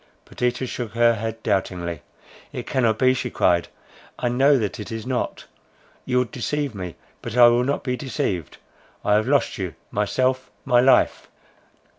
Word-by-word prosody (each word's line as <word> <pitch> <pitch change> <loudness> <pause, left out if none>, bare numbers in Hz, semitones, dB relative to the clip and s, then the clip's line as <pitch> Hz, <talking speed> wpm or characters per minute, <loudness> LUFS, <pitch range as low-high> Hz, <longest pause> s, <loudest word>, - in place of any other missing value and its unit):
Perdita 125 +1 -2
shook 120 -3 -5
her 120 0 +4
head 115 0 -5
doubtingly: 85 -4 -1 0.5
"It - - -6
cannot 115 -5 +1
be," 130 +1 +4
she 130 -1 -3
cried, 85 -6 +2 0.5
"I 120 - -1
know 135 +4 +4
that 110 0 -2
it 105 - -7
is 115 0 -5
not. 130 -1 -3 0.6
You 125 - 0
would 125 -2 +1
deceive 145 +1 -2
me, 90 -4 -6 0.3
but 120 - -5
I 120 -1 +9
will 120 +1 +3
not 140 +3 -1
be 125 -1 -1
deceived. 100 - -3 0.5
I 105 - +3
have 105 +1 +2
lost - - +1
you, - - -4 0.2
myself, 130 +5 0 0.2
my 120 - +4
life!" 130 +2 +3
120 Hz, 165 wpm, -23 LUFS, 105-130 Hz, 0.6 s, I